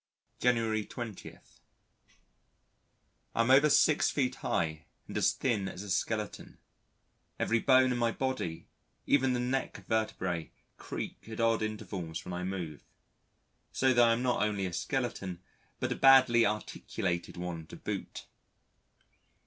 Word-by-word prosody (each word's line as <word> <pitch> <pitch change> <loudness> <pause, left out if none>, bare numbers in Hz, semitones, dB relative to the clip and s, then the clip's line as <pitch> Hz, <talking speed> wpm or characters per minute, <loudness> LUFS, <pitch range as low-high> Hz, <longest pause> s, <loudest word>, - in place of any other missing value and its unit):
January 115 -3 +2
20. 115 -2 -8 2.0
I - - -3
am 115 +3 +4
over 145 +3 +7
6 150 +1 +4
feet 130 -3 0
high 80 -3 -2 0.2
and - - -8
as - - +3
thin 110 -7 -1
as 95 - -6
a 100 - -6
skeleton; 105 +2 -2 0.8
every 115 - +1
bone 130 0 +5
in 120 - -1
my 115 -1 +2
body, 130 -11 -3 0.4
even 130 -2 +3
the 125 - 0
neck 130 +2 -2
vertebrae, 95 -7 -1 0.3
creak - - -7
at 110 - -7
odd 115 -1 +2
intervals 95 -6 -4
when 90 - -6
I 90 0 -3
move. 90 -5 -5 0.9
So 130 -1 +2
that 120 -1 +5
I - - +5
am 120 +2 -1
not 125 -5 +1
only 105 -2 0
a 90 - -4
skeleton 115 -8 -3 0.4
but - - -2
a - - 0
badly 130 -4 +6
articulated 90 -4 -3
one 85 -3 -5
to - - -10
boot. - - -5
110 Hz, 140 wpm, -31 LUFS, 95-125 Hz, 2.0 s, over